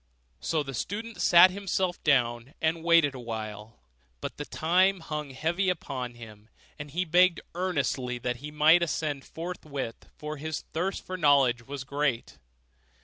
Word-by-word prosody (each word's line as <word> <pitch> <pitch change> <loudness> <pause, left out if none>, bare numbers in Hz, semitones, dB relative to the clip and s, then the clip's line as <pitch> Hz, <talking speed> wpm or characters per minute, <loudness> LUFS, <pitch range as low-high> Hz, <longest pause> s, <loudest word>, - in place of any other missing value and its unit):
So 155 - -1
the 135 -1 -7
student 220 - -4
sat 180 +1 +8
himself 190 -2 -2
down 120 -2 +1
and 160 +1 0
waited 165 -4 +5
a 130 - -8
while; 110 -2 -6 0.4
but - - -6
the 145 - -5
time 185 +5 +2
hung 150 -2 -5
heavy 165 +8 0
upon 130 -8 -4
him, 110 -2 -13 0.3
and 150 -1 -7
he 175 +6 -1
begged 180 +1 +4
earnestly 140 -8 -1
that 125 0 -3
he 145 +4 -8
might 155 +3 +5
ascend 155 -4 -2
forthwith, 155 -8 -6
for 150 0 -6
his 155 +1 -4
thirst 180 +4 -2
for 185 - -5
knowledge 135 -7 +3
was 140 -1 -5
great. 140 -3 -2
150 Hz, 150 wpm, -28 LUFS, 130-175 Hz, 0.4 s, sat